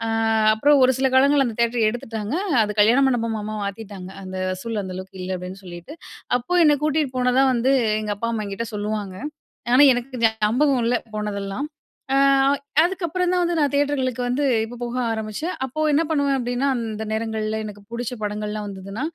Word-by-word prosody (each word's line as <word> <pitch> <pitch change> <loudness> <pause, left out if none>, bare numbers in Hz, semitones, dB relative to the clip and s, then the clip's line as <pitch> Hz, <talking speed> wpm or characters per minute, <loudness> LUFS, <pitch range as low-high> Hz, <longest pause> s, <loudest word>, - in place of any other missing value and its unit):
அ - - -2 0.5
அப்புறம் 280 +5 +4
ஒரு 260 - +4
சில 265 - +3
காலங்கள்ல 275 0 +4
அந்த 220 - -7
தியேட்ர 235 0 +1
எடுத்துட்டாங்க. 225 -1 -5 0.3
அது 210 0 -4
கல்யாணம் 245 +6 +4
மண்டபமா 220 -3 -2
மாத்திட்டாங்க. 200 -2 -7
அந்த 185 0 -7
வசூல் 205 +3 -3
அந்த 185 - -6
அளவுக்கு 190 0 -9
இல்ல 185 0 -3
அப்டீன்னு 185 +2 -8
சொல்லிட்டு. 175 - -9 0.4
அப்போ 250 +9 -7
என்ன 295 -1 +5
கூட்டீட்டு 300 -3 0
போனதா 250 +1 +3
வந்து 250 +3 +2 0.3
எங்க 210 -1 -2
அப்பா, 230 - -2
அம்மா 220 -2 -2
என்கிட்ட 210 +3 -4
சொல்லுவாங்க. 205 -2 -3 0.6
ஆனா, 275 +3 +7
எனக்கு 245 +1 -3
ஞாபகம் 230 +5 +2
இல்ல 245 +1 +2 0.2
போனதெல்லாம். 210 +4 -3 0.5
அ - - +3 0.7
அதுக்கப்புறம் 360 0 -1
தான் 360 - +2
வந்து 345 -1 0
நான் 290 -2 +2
தியேட்டர்களுக்கு 275 -4 0
வந்து, 250 +4 0 0.2
இப்போ 240 - -9
போக 240 +1 -4 0.2
ஆரம்பிச்சேன். 220 - -4
அப்போ 265 +4 -7
என்ன 315 - +3
பண்ணுவேன் 285 -3 +1
அப்டீன்னா, 245 +2 -1
அந்த 220 -2 -4
நேரங்கள்ல 220 -1 -2
எனக்கு 205 -1 -9
பிடிச்ச 245 +1 -4
படங்கள்லாம் 210 0 -3
வந்ததுனா, 195 +5 -6
230 Hz, 170 wpm, -22 LUFS, 210-270 Hz, 0.7 s, ஆனா